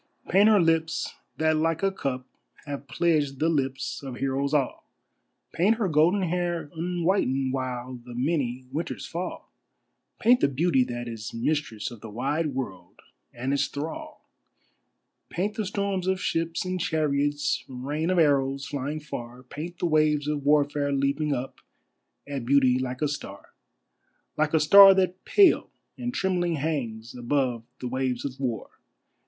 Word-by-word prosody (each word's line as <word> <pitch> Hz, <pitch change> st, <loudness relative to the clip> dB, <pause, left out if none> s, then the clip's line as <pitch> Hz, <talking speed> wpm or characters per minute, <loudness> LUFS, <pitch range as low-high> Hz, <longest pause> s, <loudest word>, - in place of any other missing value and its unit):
Paint 200 Hz, +5 st, +6 dB
her 215 Hz, -2 st, +6 dB
lips 165 Hz, -1 st, +1 dB, 0.2 s
that 160 Hz, 0 st, +2 dB
like 165 Hz, +2 st, 0 dB
a 195 Hz, -, +3 dB
cup 130 Hz, -8 st, -3 dB, 0.4 s
have 140 Hz, -1 st, -6 dB
pledged 150 Hz, -5 st, +1 dB
the 160 Hz, +4 st, +2 dB
lips 135 Hz, -4 st, -1 dB
of 135 Hz, -3 st, -6 dB
heroes 135 Hz, +2 st, -1 dB
all, 145 Hz, -4 st, -1 dB, 0.6 s
Paint 200 Hz, +7 st, +3 dB
her 220 Hz, -3 st, 0 dB
golden 170 Hz, +5 st, +3 dB
hair 175 Hz, -3 st, -2 dB
unwhitened 165 Hz, -6 st, 0 dB
while 125 Hz, -1 st, -4 dB
the 120 Hz, -1 st, -10 dB
many 130 Hz, -2 st, -1 dB
winters 160 Hz, +3 st, -4 dB
fall, 175 Hz, +2 st, -6 dB, 0.7 s
Paint 245 Hz, +2 st, +5 dB
the -, -, +4 dB
beauty 140 Hz, 0 st, +2 dB
that 120 Hz, -1 st, -5 dB
is 115 Hz, -1 st, -6 dB
mistress 115 Hz, -3 st, -2 dB
of 120 Hz, -, -11 dB
the 115 Hz, -, -8 dB
wide 140 Hz, +6 st, -1 dB
world 95 Hz, -9 st, -6 dB, 0.3 s
and 130 Hz, +3 st, -3 dB
its 140 Hz, -, +1 dB
thrall! 300 Hz, -, -7 dB, 1.0 s
Paint 195 Hz, +5 st, -2 dB
the 215 Hz, -3 st, -3 dB
storms 200 Hz, -2 st, -2 dB
of 190 Hz, 0 st, +1 dB
ships 165 Hz, +1 st, -1 dB
and 185 Hz, -1 st, -2 dB
chariots, 145 Hz, -2 st, 0 dB
rain 145 Hz, +6 st, -3 dB
of 185 Hz, -, +1 dB
arrows 140 Hz, -3 st, +2 dB
flying 145 Hz, +1 st, -3 dB
far, 125 Hz, -4 st, -8 dB
Paint 160 Hz, +7 st, -7 dB
the -, -, -2 dB
waves 155 Hz, -2 st, +2 dB
of 150 Hz, -2 st, -1 dB
Warfare 145 Hz, 0 st, +2 dB
leaping 140 Hz, +2 st, 0 dB
up 135 Hz, -1 st, -3 dB, 0.7 s
at 140 Hz, -3 st, -4 dB
Beauty 130 Hz, 0 st, +4 dB
like 130 Hz, +2 st, -3 dB
a -, -, +3 dB
star, 145 Hz, 0 st, -7 dB, 0.8 s
Like 155 Hz, +1 st, +1 dB
a -, -, +5 dB
star 195 Hz, +5 st, +9 dB
that 185 Hz, -1 st, 0 dB
pale 395 Hz, -4 st, +5 dB, 0.3 s
and 245 Hz, 0 st, -3 dB
trembling 180 Hz, -6 st, 0 dB
hangs 125 Hz, -7 st, -3 dB
above 125 Hz, -2 st, -1 dB
the 125 Hz, -, -4 dB
waves 130 Hz, 0 st, -2 dB
of 135 Hz, -1 st, -5 dB
War. 125 Hz, -4 st, -3 dB
145 Hz, 150 wpm, -26 LUFS, 130-170 Hz, 1.0 s, star